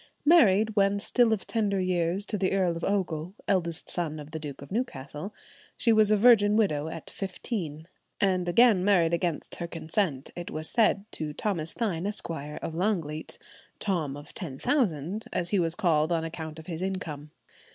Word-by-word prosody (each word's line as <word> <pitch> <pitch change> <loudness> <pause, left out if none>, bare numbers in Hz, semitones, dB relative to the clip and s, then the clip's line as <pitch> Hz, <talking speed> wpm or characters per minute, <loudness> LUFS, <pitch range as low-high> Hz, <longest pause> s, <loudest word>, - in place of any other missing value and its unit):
Married 220 - +5
when 200 0 +3
still 230 +3 +2
of 215 -3 0
tender 205 -4 0
years 180 +1 0
to 215 - -3
the 195 -2 0
Earl 185 -3 +2
of 165 - -6
Ogle, 180 -3 -1
eldest 170 -3 0
son 160 -3 -2
of 150 +1 -10
the 160 - -4
Duke 145 -2 -6
of 140 - -13
Newcastle, 170 - -4 0.5
she 230 - +3
was 215 -1 +5
a 215 - +4
virgin 210 -2 +6
widow 160 -9 +2
at 160 0 -7
fifteen, 180 -5 -4 0.3
and 185 -3 +1
again 215 -1 +5
married 175 -4 +3
against 170 -2 -1
her 170 - -4
consent, 165 -4 -2
it 175 -1 -6
was 155 +1 -5
said, 210 -3 +2
to 150 -1 -4
Thomas 165 -4 -2
Thynne, 195 -6 -1
Esq., 205 - -3
of 150 +1 -5
Longleat;[112:1] 165 -4 -2 0.4
"Tom 160 -8 -1
of 145 +1 -12
Ten 150 -8 -5
Thousand," 200 - 0
as 175 -1 -1
he 200 - +2
was 165 -1 +1
called 160 -3 +2
on 165 -1 +1
account 160 -1 -6
of 160 - -10
his 165 -1 -5
income. 165 -6 -4
175 Hz, 180 wpm, -28 LUFS, 160-205 Hz, 0.5 s, virgin